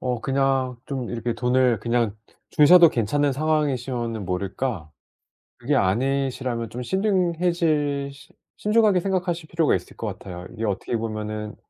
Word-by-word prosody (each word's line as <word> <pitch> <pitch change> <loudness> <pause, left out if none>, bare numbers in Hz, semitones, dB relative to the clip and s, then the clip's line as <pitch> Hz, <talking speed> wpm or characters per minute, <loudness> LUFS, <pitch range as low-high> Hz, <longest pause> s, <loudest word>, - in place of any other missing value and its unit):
어 125 -3 -2
그냥 135 -1 0
좀 130 -4 -4
이렇게 120 0 -2
돈을 125 -1 +2
그냥 115 -3 0 0.3
주셔도 170 +3 +7
괜찮은 140 +3 0
상황이시면은 130 -7 -1
모를까 95 - -3 0.7
그게 140 +5 -1
아니시라면 125 +2 0
좀 125 +2 -6
신중해질 170 - 0
신 140 0 -18 0.2
신중하게 210 -3 +3
생각하실 175 -3 -2
필요가 165 -2 +2
있을 90 - -7
것 - - -5
같아요. 90 0 -7
이게 115 - -4
어떻게 105 +3 -2
보면은 110 -1 -4
130 Hz, 330 characters per minute, -24 LUFS, 115-155 Hz, 0.7 s, 주셔도